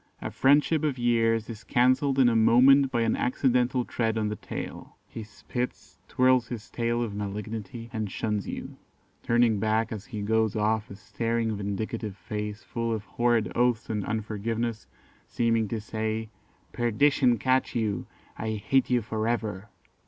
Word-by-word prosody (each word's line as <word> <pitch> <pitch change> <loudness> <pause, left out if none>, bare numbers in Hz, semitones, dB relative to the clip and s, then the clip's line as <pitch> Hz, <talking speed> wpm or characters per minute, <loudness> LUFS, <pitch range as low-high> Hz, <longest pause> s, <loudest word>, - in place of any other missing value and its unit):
A - - -5
friendship 145 +3 +3
of 145 -4 0
years 115 -2 +2
is 115 -2 -8
cancelled 130 +3 +2
in 130 -2 +6
a 120 - +3
moment 130 +5 +6
by 120 -3 0
an 115 -1 +2
accidental 125 -1 +1
tread 115 -1 -1
on 105 -1 0
the 105 - -3
tail. - - -7
He 115 - -8
spits, 120 +4 -6
twirls 130 -2 +3
his 115 -3 -7
tail 120 0 0
of 110 -3 -4
malignity, 105 +2 -5
and 110 -3 -2
shuns 105 0 -2
you, - - -6 0.4
turning 115 -3 +3
back 110 +1 +1
as 110 -2 -6
he 105 -4 -5
goes 110 0 +1
off 110 0 0
a 100 - -8
staring 115 +2 -2
vindictive 100 0 -4
face 105 +2 -5
full 115 -1 -3
of 110 -2 -2
horrid 120 -2 +1
oaths 120 -2 +1
and 105 -2 -1
unforgiveness, 110 +2 -3 0.4
seeming 115 -2 +1
to 115 +2 -3
say, 110 0 -3 0.4
'Perdition 125 +1 +3
catch 130 +2 +1
you! 110 -4 -1 0.3
I 110 0 -2
hate 115 +5 +1
you 125 -2 +2
for 110 0 -2
ever. 110 -3 -2
115 Hz, 160 wpm, -27 LUFS, 110-120 Hz, 0.4 s, in